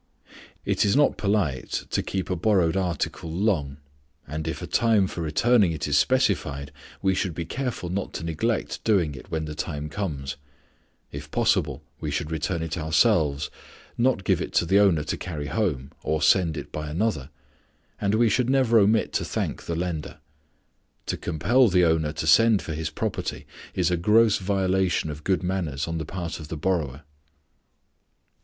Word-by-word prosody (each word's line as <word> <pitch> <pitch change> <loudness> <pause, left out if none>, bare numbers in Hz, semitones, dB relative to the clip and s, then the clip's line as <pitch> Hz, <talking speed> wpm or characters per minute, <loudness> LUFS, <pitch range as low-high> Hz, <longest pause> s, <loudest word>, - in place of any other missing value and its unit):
It - - +1
is 100 - +2
not 145 +1 +4
polite 100 - -1
to - - +1
keep 95 -1 -3
a - - +1
borrowed 90 -2 +2
article 90 -3 -2
long; 80 -7 0 0.5
and 80 +2 -4
if 80 - -3
a - - -5
time 110 -4 +3
for 90 - -5
returning 95 +4 +3
it 80 - -3
is 75 - +1
specified, 80 - +1 0.3
we 95 0 +3
should 90 -3 -2
be 85 - -3
careful 125 -4 -3
not 95 +2 -3
to - - -5
neglect 95 +8 -2
doing 90 -9 +2
it - - -11
when 80 -1 -2
the 75 - -5
time 75 0 -4
comes. 75 -7 -4 0.7
If 70 +1 -8
possible, 75 - +1 0.2
we 75 - -3
should 75 +2 -3
return 80 +2 -2
it 80 +1 -3
ourselves, 75 -2 +2 0.4
not 120 -5 +1
give - - +1
it - - -5
to - - +3
the 95 +4 +4
owner 90 -7 +4
to - - -3
carry 75 -5 -5
home 70 - -1
or 80 0 -1
send 85 -1 +3
it - - -7
by 75 -1 -5
another; 80 -4 -1 0.7
and 100 +1 +1
we 115 +1 +4
should 125 +2 +1
never 130 -4 +4
omit 105 +2 +2
to - - 0
thank - - -3
the 85 - -2
lender. 85 -2 -4 0.9
To - - -2
compel 120 - +2
the 90 -3 +4
owner 80 -2 +2
to 80 - -4
send 110 +5 +5
for 80 - -4
his 80 0 -3
property 80 - -4 0.3
is 90 -1 +1
a 90 - +2
gross 105 +4 +4
violation 95 -4 0
of 75 +1 -9
good 95 +1 0
manners 85 -7 -2
on 85 0 -3
the 80 - -4
part 85 0 -5
of 75 - -8
the 80 - -5
borrower. 75 -4 -1
85 Hz, 175 wpm, -25 LUFS, 75-100 Hz, 0.9 s, send